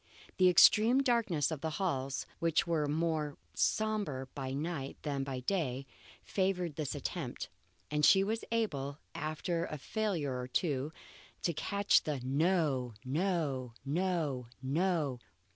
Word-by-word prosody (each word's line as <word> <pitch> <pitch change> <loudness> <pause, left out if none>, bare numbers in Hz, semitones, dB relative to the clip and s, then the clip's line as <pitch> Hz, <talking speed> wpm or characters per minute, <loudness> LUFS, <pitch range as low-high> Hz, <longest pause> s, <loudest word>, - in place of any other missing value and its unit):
The 185 -1 +6
extreme 220 +8 +6
darkness 225 - +2
of 155 -3 -4
the 160 - -1
halls, 135 -8 -1
which 165 -1 +2
were 160 -3 +1
more 155 -1 0 0.2
sombre 210 -12 0
by 130 -2 -4
night 145 -1 -3
than 140 -2 -1
by 135 -2 -4
day, 135 -4 -1 0.4
favoured 180 -5 0
this 150 -3 -3
attempt, - - -4 0.4
and 150 0 0
she 190 +5 +7
was 220 +3 -1
able, 145 -12 -1 0.2
after 165 +3 -2
a 155 - -5
failure 155 - -1
or 125 - -4
two, 140 +1 0 0.5
to 170 - +1
catch 200 +6 +3
the 150 -3 -2
No! 140 - +1
no! 140 -5 -1
no! 150 -5 0
no! 145 -1 0
155 Hz, 130 wpm, -33 LUFS, 135-185 Hz, 0.5 s, she